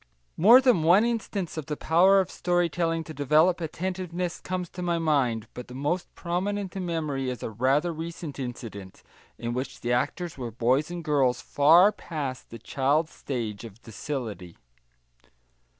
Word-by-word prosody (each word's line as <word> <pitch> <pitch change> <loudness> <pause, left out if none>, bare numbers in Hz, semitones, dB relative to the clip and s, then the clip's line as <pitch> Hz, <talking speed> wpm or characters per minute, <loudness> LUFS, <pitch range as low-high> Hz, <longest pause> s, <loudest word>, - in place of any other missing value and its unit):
More 230 +9 +7
than 250 -10 +4
one 180 +8 +5
instance 210 -7 -3
of 155 - -5
the 150 - -3
power 185 +5 +4
of 190 -1 -1
story 175 -1 +1
telling 165 0 -1
to 160 - -9
develop 155 +5 +3
attentiveness 180 +1 -3
comes 185 -1 -3
to 180 - -8
my 175 -1 0
mind, 135 -9 +1
but 125 - -8
the 125 - -10
most 150 +7 -2
prominent 190 +2 -3
in 185 -2 -3
memory 150 -6 -2
is 125 -3 -5
a - - -4
rather 135 - +1
recent 165 -2 -7
incident, 115 -7 -7 0.3
in 120 0 -4
which 130 +1 -5
the 120 +1 0
actors 145 +6 -2
were 120 -2 -4
boys 130 +7 +1
and 175 -1 -6
girls 135 -5 +2
far 165 +11 +5
past 145 -10 -6
the 115 - -8
child 140 +7 0
stage 115 -9 -5
of 115 -1 -11
docility. 110 - -6
155 Hz, 165 wpm, -26 LUFS, 125-175 Hz, 0.3 s, More